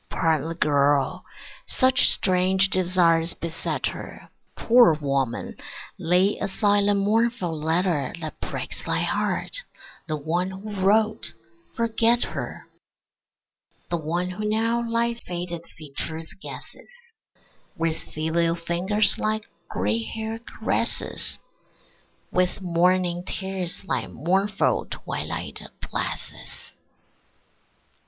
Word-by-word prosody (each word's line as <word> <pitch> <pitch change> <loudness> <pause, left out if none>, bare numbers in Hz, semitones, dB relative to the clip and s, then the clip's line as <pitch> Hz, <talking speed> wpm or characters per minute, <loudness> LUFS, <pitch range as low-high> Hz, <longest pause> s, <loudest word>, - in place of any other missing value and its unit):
Pardon 160 -1 +1
the 165 - -4
girl; 145 +2 +2 0.4
such 260 -1 +4
strange 190 +1 +4
desires 175 -2 +3
beset 165 -1 -3
her. - - -6 0.3
Poor 235 -8 +6
woman, 140 -5 -1 0.4
lay 180 +4 +3
aside 205 +1 +2
the 205 - +4
mournful 205 -3 +1
letter 160 -2 +1
That 155 -2 -6
breaks - - -4
thy - - +1
heart; - - 0 0.5
the 155 -2 -1
one 170 +5 -1
who 195 +3 -7
wrote, 215 +2 +3 0.4
forget 230 +1 +3
her: - - -6 1.2
The 170 - +2
one 170 +3 -2
who 205 +4 -5
now 230 +2 +1
thy 235 0 +1
faded 175 -6 -6
features 160 +2 -6
guesses, 480 -1 -11 0.6
With 165 -1 0
filial 165 +2 0
fingers 180 +5 +3
thy 215 0 0 0.3
gray 105 +5 0
hair 220 - -4
caresses, 235 - -1 0.9
With 180 +1 +1
morning 180 0 +2
tears 190 -1 -3
thy 195 - -1
mournful 195 +6 +1
twilight - - -4 0.3
blesses. - - -5
180 Hz, 100 wpm, -25 LUFS, 165-210 Hz, 1.2 s, Poor